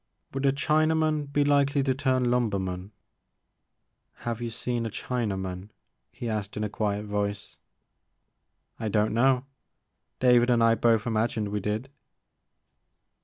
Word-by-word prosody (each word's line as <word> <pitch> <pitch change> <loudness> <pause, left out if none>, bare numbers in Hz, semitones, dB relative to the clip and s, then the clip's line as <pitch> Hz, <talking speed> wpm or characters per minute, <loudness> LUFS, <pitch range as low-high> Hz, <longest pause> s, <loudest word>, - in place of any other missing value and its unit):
Would 135 +1 0
a - - +5
Chinaman 155 +1 +1
be 145 0 +2
likely 140 -1 +3
to 135 -1 +2
turn 130 -1 +1
Itunber 120 -5 +1
man?'* 95 +1 -5 0.7
*' - - -52
Have 115 -1 -2
you 120 - -2
seen 120 +1 -2
a 115 - -2
Chinaman? 95 -5 -3 0.2
" - - -52
he 120 - -6
asked 105 -2 -3
in 105 - -1
a 105 - -1
quiet 105 0 -2
voice. 100 -1 -3 1.2
I 110 - -2
don't 105 0 +1
know; 130 +2 +3 0.7
David 125 -1 +5
and 120 -2 +4
I 115 0 +5
both 115 -2 +2
imagined 110 -2 0
we 105 0 -2
did.'' 105 +5 -2
115 Hz, 145 wpm, -27 LUFS, 105-130 Hz, 1.2 s, a